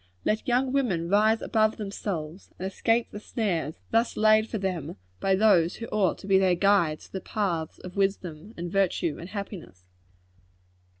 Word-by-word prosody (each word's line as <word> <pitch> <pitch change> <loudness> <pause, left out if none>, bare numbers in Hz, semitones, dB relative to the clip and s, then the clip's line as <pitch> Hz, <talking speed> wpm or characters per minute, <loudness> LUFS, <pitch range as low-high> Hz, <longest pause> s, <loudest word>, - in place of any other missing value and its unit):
Let 215 +1 0
young 255 +1 +1
women 190 -12 0
rise 215 +3 +3
above 220 0 +2
themselves, 195 -5 -5
and 185 - -5
escape 225 +5 0
the 205 - -7
snares 180 - -2
thus 230 +1 +1
laid 215 +1 +4
for 220 - -2
them 180 -6 -3 0.2
by 195 0 +2
those 190 -5 +4
who 230 - -6
ought 205 -4 +1
to - - -11
be 190 -1 +5
their 185 -2 +3
guides 175 -5 +2
to - - -19
the 190 - -5
paths 175 -7 -2
of 185 +1 -10
wisdom, 195 -1 -2
and 170 0 -5
virtue, 185 -5 +1
and 170 - -8
happiness. 195 - -8
195 Hz, 170 wpm, -27 LUFS, 175-215 Hz, 0.2 s, be